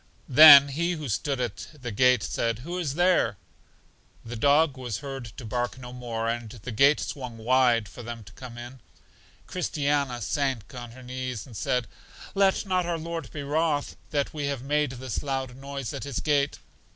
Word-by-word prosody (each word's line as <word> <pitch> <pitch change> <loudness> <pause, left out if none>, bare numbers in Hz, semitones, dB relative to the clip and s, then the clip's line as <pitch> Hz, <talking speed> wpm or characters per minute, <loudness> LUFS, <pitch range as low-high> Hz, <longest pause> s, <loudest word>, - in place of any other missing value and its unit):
Then 140 0 +10
He 170 +6 -1
who 155 -4 -5
stood 135 +5 -1
at 120 -5 -4
the 125 -2 -5
gate 125 +1 +4
said, 115 +1 -1
Who 175 +2 -4
is 145 -6 -2
there? 175 - +3 0.9
The 120 +1 -6
dog 145 +4 +3
was 125 -5 -4
heard 135 -3 -6
to 125 - -8
bark 120 +3 -2
no 125 -1 -9
more, 115 -2 -4
and 115 -1 -2
the 115 +2 -8
gate 140 +7 +4
swung 125 -5 -5
wide 120 -1 +3
for 120 - -11
them 115 -1 -7
to - - -15
come 125 -2 -10
in. 120 +2 -9 0.7
Christiana 145 -7 -1
sank 135 -2 -2
on 120 -2 -8
her 130 +1 -12
knees, 125 -3 -5
and 120 - -13
said, 125 +3 0 0.5
Let 195 0 +2
not 185 -2 0
our 170 -1 -1
Lord 165 +1 -5
be 145 - -5
wroth 150 0 0
that 145 -2 -1
we 145 -2 -3
have 140 -3 -3
made 145 -1 0
this 130 -2 -4
loud 135 -3 -3
noise 135 -3 -6
at - - -5
His 140 -4 -3
gate. 145 -2 +1
130 Hz, 185 wpm, -26 LUFS, 120-145 Hz, 0.9 s, Then